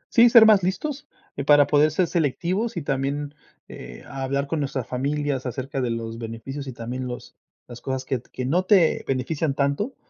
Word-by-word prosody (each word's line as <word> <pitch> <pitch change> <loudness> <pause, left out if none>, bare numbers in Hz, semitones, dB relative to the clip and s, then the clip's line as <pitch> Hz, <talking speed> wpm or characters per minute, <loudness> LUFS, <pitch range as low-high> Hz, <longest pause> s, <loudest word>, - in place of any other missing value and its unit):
Sí, 240 0 +8
ser 230 -2 +8
más 215 -3 +6
listos, 260 +11 -3 0.3
eh, - - -2
para 145 0 +6
poder 150 +1 +3
ser 165 +4 +1
selectivos 180 - -1
y 170 - -3
también, 140 +1 -2 0.3
eh, - - -10
hablar 135 +1 -3
con 155 +2 -3
nuestras 135 -3 -3
familias 140 +1 -2
acerca 130 +2 -4
de 125 - -1
los 115 0 -4
beneficios 120 +5 -7
y - - -4
también 125 +2 -5
los 125 0 -8 0.3
las 120 0 -11
cosas 130 0 -4
que 130 -2 -2
que 125 +1 -7
no 170 +8 +1
te 185 -4 +3
benefician 135 +3 -1
tanto, 140 - -1
140 Hz, 185 wpm, -24 LUFS, 130-165 Hz, 0.3 s, Sí